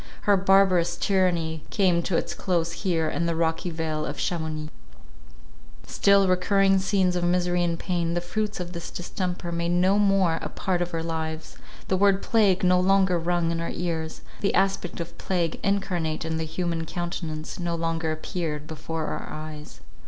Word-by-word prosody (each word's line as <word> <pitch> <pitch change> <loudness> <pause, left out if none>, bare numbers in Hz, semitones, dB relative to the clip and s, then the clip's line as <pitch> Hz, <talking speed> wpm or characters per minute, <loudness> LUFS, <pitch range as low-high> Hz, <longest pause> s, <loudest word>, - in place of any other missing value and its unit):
Her 205 - +4
barbarous 185 -3 +4
tyranny 175 -5 +1
came 185 -4 +2
to 170 0 0
its - - -2
close 170 -3 0
here 170 -3 0
in 170 +2 -1
the 170 - 0
rocky 165 +1 0
vale 160 -2 -2
of - - -4
Chamounix. 155 -3 -3 1.1
Still 200 -1 +4
recurring 195 +1 +3
scenes 190 -2 +1
of 175 - 0
misery 175 0 +2
and 170 -1 0
pain, 170 -1 -1
the - - +2
fruits 210 +4 -3
of 175 0 -5
this 170 -1 -6
distemper, 175 -1 -4
made 170 0 -1
no 185 +3 +3
more 195 -5 +3
a - - -4
part 185 -3 -1
of 175 0 -2
our 165 - -2
lives—the 160 +3 -4
word 200 0 +3
plague 200 -5 +3
no 180 0 +5
longer 190 -1 +3
rung 170 0 0
in 165 0 -2
our 170 - -3
ears—the 165 +3 -3
aspect 195 -2 0
of 170 0 -7
plague 175 -4 -1
incarnate 175 -5 -1
in 160 0 -2
the 160 - -2
human 165 0 -2
countenance 165 -3 -4
no 170 -1 -1
longer 165 -1 -1
appeared 155 -2 -3
before 160 0 -4
our - - -4
eyes. 155 -1 -8
175 Hz, 165 wpm, -26 LUFS, 165-185 Hz, 1.1 s, no